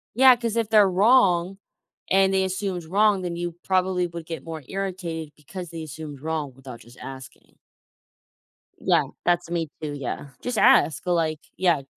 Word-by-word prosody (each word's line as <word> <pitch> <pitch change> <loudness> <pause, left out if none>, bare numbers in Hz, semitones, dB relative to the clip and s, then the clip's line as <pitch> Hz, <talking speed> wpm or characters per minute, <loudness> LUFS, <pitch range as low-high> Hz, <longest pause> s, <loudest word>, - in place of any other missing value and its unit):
Yeah, 260 0 +8
'cause 230 -1 -3
if 225 -2 0
they're 210 -3 +6
wrong 195 -3 +4 0.5
and 195 0 +4
they 190 0 +3
assumed 190 -2 -3
wrong, 200 +2 +3
then 175 -1 -3
you 175 -1 -3
probably 185 -1 +1
would 170 -1 -8
get 160 -4 -6
more 160 -3 -7
irritated 175 -5 -4
because 175 +4 -9
they 165 -1 -7
assumed 150 -2 -8
wrong 155 -4 -3
without 130 -3 -11
just 120 +2 -17
asking. 130 0 -11 1.2
Yeah. - - +2 0.2
That's 175 -1 +1
me 165 -3 -2
too. 150 -1 -4
Yeah. 140 +1 -5
Just 245 -3 -3
ask. 155 - +4
Like 160 -3 +1 0.2
yeah. 175 -6 +2
175 Hz, 160 wpm, -24 LUFS, 155-190 Hz, 1.2 s, Yeah